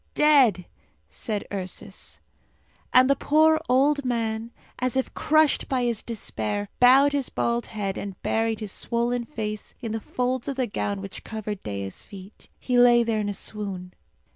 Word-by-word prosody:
"Dead!" 265 - +4 0.4
said 210 -4 -4
Ursus. 195 +1 -6 0.7
And 255 0 +6
the 275 - +4
poor 315 +3 +3
old 285 +3 +3
man, 230 -2 -2 0.3
as 255 0 0
if 265 - -1
crushed 310 -1 +2
by 255 -2 +1
his 235 -3 0
despair, 110 - -3
bowed 270 +3 +6
his 280 -3 0
bald 235 0 -1
head 200 -3 -3
and 195 -2 -7
buried 225 0 0
his 210 -2 -4
swollen 235 +2 -1
face 215 -5 -5
in 230 -3 -5
the 225 0 -3
folds 250 +2 -2
of 275 - -2
the 255 -1 0
gown 200 -2 -3
which 195 -1 -7
covered 215 -2 -5
Dea's 100 -2 -5
feet. 195 +1 -13
He 250 -1 +1
lay 240 -1 +6
there 225 -2 0
in 205 -1 -1
a - - -2
swoon. 190 -4 -6
230 Hz, 165 wpm, -25 LUFS, 205-255 Hz, 0.7 s, And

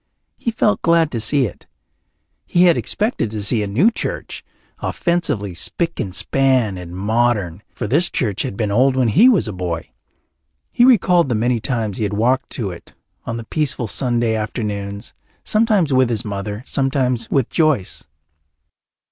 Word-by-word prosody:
He - - -3
felt 215 -2 +1
glad 165 -2 +3
to 115 - -2
see 130 +5 +3
it; 105 - -9 0.8
he 175 - +3
had 175 -2 +5
expected 210 - -1
to 105 -1 -5
see 110 +2 +1
a 105 - -2
new 140 - +3
church, - - -5 0.4
offensively 155 - -1
spick 165 - -1
and 100 -7 -4
span 130 -7 +2
and 90 -1 -8
modern, 105 -3 0
for 120 - -6
this 150 - +2
church 105 -6 -1
had 100 - -4
been 105 -3 -1
old 130 +5 +3
when 130 -3 +2
he 210 - +6
was 210 - +2
a 105 - -4
boy. 90 -3 -4 0.8
He 245 - +4
recalled 180 - +4
the 120 - 0
many 120 +2 +1
times 110 -3 -2
he - - -2
had 105 0 -2
walked 125 +4 +1
to 105 -6 -3
it 85 - -13 0.3
on 115 - -4
the 115 - -6
peaceful 140 0 -2
Sunday 120 0 0
afternoons, 105 -2 -4 0.3
sometimes 215 - +2
with 130 -2 +3
his 115 -3 -1
mother, 105 +2 -5
sometimes 130 -4 -1
with 135 -5 0
Joyce. 155 - 0
120 Hz, 165 wpm, -19 LUFS, 105-150 Hz, 0.8 s, he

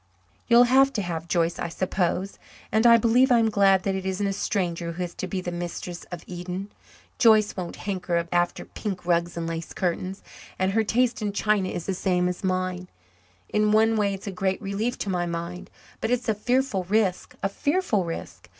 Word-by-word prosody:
You'll 240 0 +7
have 265 +2 +5
to 210 - -1
have 165 -2 -4
Joyce, 170 -1 0
I - - -2
suppose. 185 +2 -1 0.3
And 220 +3 +4
I 235 0 +8
believe 240 +3 +4
I'm 230 -2 +4
glad 195 -2 +4
that 195 - 0
it 190 0 -3
isn't 190 +2 -1
a 195 - 0
stranger 175 -4 -2
who 180 +2 -3
is 175 -1 -5
to 185 - -5
be 185 +1 -3
the 175 - -4
mistress 175 0 -5
of 175 -2 -8
Eden. 180 +2 -6 0.5
Joyce 215 -3 +5
won't 180 -2 -5
hanker 180 -4 -2
after 175 0 0
pink 190 -5 -5
rugs 170 0 +1
and 165 - -2
lace 165 0 -5
curtains. 185 +1 -2 0.3
And 190 +1 +1
her 220 +2 +2
taste 240 +2 +1
in 205 -1 -2
china 205 -2 +1
is 170 - -4
the 195 - -1
same 180 -1 +1
as 180 +1 -4
mine. 185 -1 -1 0.6
In 210 0 +2
one 220 +1 +4
way 200 -2 +1
it's 195 - -11
a 200 - -3
great 190 0 -1
relief 210 +5 -2
to 200 - -4
my 175 -1 0
mind. 170 +1 -5 0.3
But 225 - -2
it's 250 0 0
a 220 - +3
fearful 245 -2 0
risk 195 -1 0
a - - +3
fearful 285 - 0
risk. 165 -1 -7
190 Hz, 200 wpm, -25 LUFS, 175-215 Hz, 0.6 s, I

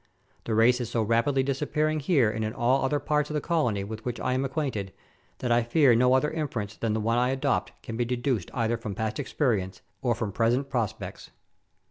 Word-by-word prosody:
The 110 - -1
race 120 +3 +4
is 120 - -4
so 115 -2 0
rapidly 115 +5 +2
disappearing 150 +3 0
here 140 - +3
and 110 0 -3
in 110 0 -2
all 125 +3 +2
other 135 +2 +1
parts 150 +1 0
of 150 - -4
the - - +2
colony 140 - 0
with 110 +2 -7
which 120 -1 -4
I 125 - 0
am 130 +1 0
acquainted, 130 -9 -2 0.5
that 125 - -2
I 120 0 +4
fear 125 +2 +4
no 125 +2 +4
other 150 +3 +2
inference 120 -10 -3
than 115 -2 -1
the 110 - 0
one 115 +2 +1
I 125 +1 +2
adopt 130 -9 0
can 115 - -5
be 120 - +1
deduced 120 -4 -1
either 115 -2 0
from 110 -4 -6
past 110 +1 -2
experience 115 -9 -1 0.2
or 120 -3 +1
from 110 -2 -3
present 120 +7 +1
prospects. 115 -6 -3
120 Hz, 210 wpm, -27 LUFS, 110-135 Hz, 0.5 s, race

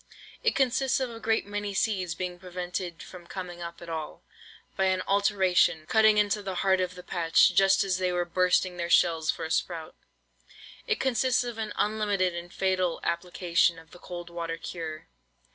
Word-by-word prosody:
It 465 - +2
consists 265 0 +2
of 260 -2 -2
a 225 - -9
great 225 0 0
many 205 0 -4
seeds 185 -5 0
being 180 0 -5
prevented 180 -1 -5
from 175 -2 -12
coming 175 -2 -7
up 170 0 -7
at - - -10
all, 160 -2 -6 0.5
by 190 - +1
an 185 -1 +1
"alteration" 190 -5 +2
cutting 220 +2 +4
into 210 0 +2
the 190 -2 -5
heart 190 -1 +4
of 180 0 -2
the 180 - -10
patch 170 0 +3
just 195 +2 +4
as 185 -2 0
they 185 -1 +1
were 175 0 0
bursting 180 +1 +1
their 170 0 -3
shells 165 -3 +3
for 165 - 0
a 160 - -6
sprout. 165 -2 -2 0.9
It 445 - 0
consists 255 -1 +2
of 240 -2 -6
an 215 -1 -3
unlimited 205 -4 +1
and 170 +1 -7
fatal 185 -3 0
application 170 0 +1
of 165 0 -15
the 175 - -14
cold 175 -1 -8
water 165 -1 -4
cure. 160 -3 -6
185 Hz, 180 wpm, -28 LUFS, 170-205 Hz, 0.9 s, cutting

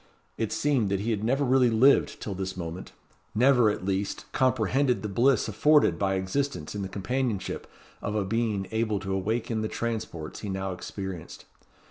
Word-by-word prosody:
It 110 -2 -2
seemed 135 -8 +1
that 100 0 0
he 115 +3 -1
had 105 -1 -1
never 135 +5 +2
really 130 -1 +4
lived 125 +5 +4
till 105 - -4
this 95 0 -4
moment; 85 +1 -6 0.4
never, 125 -1 +5
at 100 -3 -3
least, 95 +1 -2
comprehended 130 0 +2
the - - -1
bliss 120 +7 +3
afforded 150 - +4
by 95 -1 +1
existence 95 - -2
in 105 - -4
the 95 - -4
companionship 110 +2 -2 0.3
of 105 - -3
a 105 -2 0
being 110 -2 0
able 110 -2 0
to 95 +1 -3
awaken 110 +3 -1
the 110 - -1
transports 110 -10 -4
he 105 - -5
now 95 0 -2
experienced. 90 -2 -7
105 Hz, 170 wpm, -27 LUFS, 95-125 Hz, 0.4 s, never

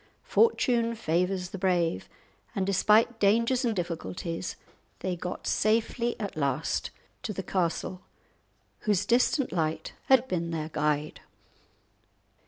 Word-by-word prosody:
Fortune 240 - +2
favours 180 -1 0
the 195 - -6
brave, 175 - +1 0.5
and 195 - 0
despite 215 +4 +3
dangers 230 +5 +3
and 230 -3 +1
difficulties 170 - -4 0.5
they 185 -1 -1
got 180 +1 -6
safely 230 +2 +1
at 205 -3 -4
last 150 +1 -1 0.3
to 220 - -3
the 190 - -4
castle, 180 0 -1 0.8
whose 205 -4 +1
distant 250 +3 +2
light 160 -3 -2
had 260 -1 +5
been 170 -5 -2
their 160 -2 -3
guide. 150 -1 -1
185 Hz, 115 wpm, -28 LUFS, 165-230 Hz, 0.8 s, had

